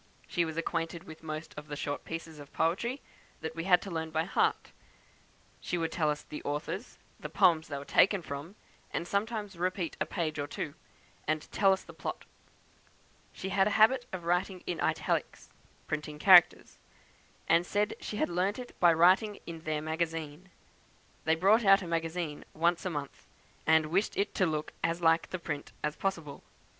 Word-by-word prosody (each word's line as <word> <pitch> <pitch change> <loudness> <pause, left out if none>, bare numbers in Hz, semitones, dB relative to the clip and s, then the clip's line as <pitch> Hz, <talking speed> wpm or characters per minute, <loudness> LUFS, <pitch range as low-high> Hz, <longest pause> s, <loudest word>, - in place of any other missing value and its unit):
She 175 -2 +1
was 160 0 -6
acquainted 165 0 -2
with 160 -4 -11
most 155 0 -6
of 150 0 -8
the 145 - -5
short 145 0 -4
pieces 165 -1 -6
of 145 -1 -12
poetry 235 - 0 0.4
that 160 0 -5
we 165 +1 -4
had 180 -2 +5
to 195 - -7
learn 160 -1 -3
by 160 0 0
heart; 180 - 0 1.0
would 165 -2 0
tell 155 -3 +1
us 150 0 -2
the 150 - -8
authors, 150 - -4 0.2
the - - -6
poems 160 -3 +4
they 145 - -4
were 140 - -7
taken 195 +3 +4
from, 145 +6 -7 0.4
and 170 - -3
sometimes 205 0 -2
repeat 180 -1 -2
a - - +1
page 155 -5 -2
or 145 - -2
two, 145 0 -5 0.5
and 155 0 -1
tell 195 -1 +4
us 190 - 0
the - - -12
plot. - - -5 1.1
She 190 - -6
had 195 +1 +3
a 210 - +1
habit 245 +3 +5
of 185 -2 -5
writing 180 +2 0
in 175 - -3
italics - - -1 0.3
(printing 150 -1 -4
characters), 180 +1 +6 0.7
and 165 +1 +4
said 205 +3 0
she 210 - -5
had - - +1
learnt 180 +4 0
it 250 -1 -8
by 175 -1 +7
writing 185 +6 +4
in 165 -1 -7
their 155 -1 -1
magazine. 160 +1 -3 0.8
They 160 +1 +4
brought 200 +7 +4
out 195 -1 +6
a - - -6
'magazine' 165 -2 -2
once 170 +3 +1
a - - 0
month, 145 -4 -6 0.4
and 160 0 +5
wished 195 +5 +1
it 200 - 0
to 190 - +2
look 155 -1 -3
as 165 +1 0
like 165 -1 +3
print 150 -3 -5
as 150 +1 -1
possible. 165 -7 -3
165 Hz, 180 wpm, -31 LUFS, 155-190 Hz, 1.1 s, by